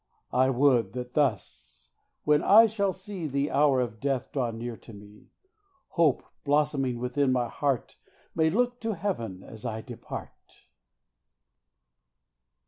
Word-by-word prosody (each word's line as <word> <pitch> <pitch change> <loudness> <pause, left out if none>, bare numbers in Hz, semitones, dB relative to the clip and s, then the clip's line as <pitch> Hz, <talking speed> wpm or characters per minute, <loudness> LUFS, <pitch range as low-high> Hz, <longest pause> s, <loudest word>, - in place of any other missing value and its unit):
I 130 +1 +4
would 125 -6 +3
that 125 0 -6
thus, 60 - -2 0.3
when 150 0 +3
I 220 +3 +8
shall 200 -3 0
see 190 -3 -6
The 140 +1 -1
hour 140 -1 +4
of 115 -3 -4
death 135 -1 -2
draw 130 -4 -1
near 115 +1 -5
to 115 - -14
me, 105 +1 -15 0.6
Hope, 160 -6 +2 0.2
blossoming 145 -4 +1
within 125 +3 0
my 125 -2 +1
heart, 140 0 -2 0.4
May 160 -1 +2
look 245 +6 0
to 225 -2 -2
heaven 115 - -4
as 110 0 -11
I 110 -2 -3
depart. 120 0 -10
130 Hz, 135 wpm, -27 LUFS, 115-150 Hz, 0.6 s, I